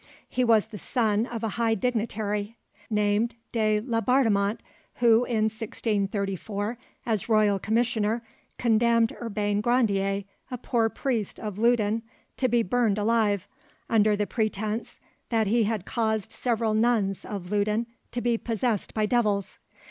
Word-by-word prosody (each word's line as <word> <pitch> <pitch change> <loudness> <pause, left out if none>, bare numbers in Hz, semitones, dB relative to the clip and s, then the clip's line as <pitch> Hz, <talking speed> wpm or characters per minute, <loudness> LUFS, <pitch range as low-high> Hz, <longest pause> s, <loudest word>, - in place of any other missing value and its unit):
He 255 - 0
was 225 -3 +4
the 215 -2 -10
son 220 +2 +1
of 230 -2 -5
a 225 - 0
high 225 -1 +2
dignitary 215 -1 -2 0.3
named 210 +2 +1 0.2
de 215 -2 +2
Laubardemont, 230 -3 +2 0.4
who 235 0 +4
in 225 -3 0
1634, 210 -1 -2 0.3
as 220 -1 -1
royal 210 -3 +3
commissioner, 225 +1 0 0.3
condemned 230 0 +3
Urbain 205 -2 -1
Grandier, 200 -5 +1 0.3
a 250 - -4
poor, 230 -2 +1
priest 230 -5 -2
of 210 -2 -5
Loudun, 225 -1 +2 0.4
to 255 - +2
be 235 0 +3
burnt 225 0 +1
alive, 210 -2 +1 0.4
under 215 -2 +4
the 205 0 0
pretence 215 0 -2 0.3
that 225 -2 +2
he 225 +2 +2
had 210 -3 -2
caused 220 -2 -1
several 230 -3 0
nuns 215 -4 +1
of 195 -3 -6
Loudun 210 +2 +1 0.2
to 240 - -3
be 235 -1 +1
possessed 230 -2 -1
by 215 -1 +2
devils. 210 -4 0
220 Hz, 135 wpm, -26 LUFS, 205-235 Hz, 0.4 s, was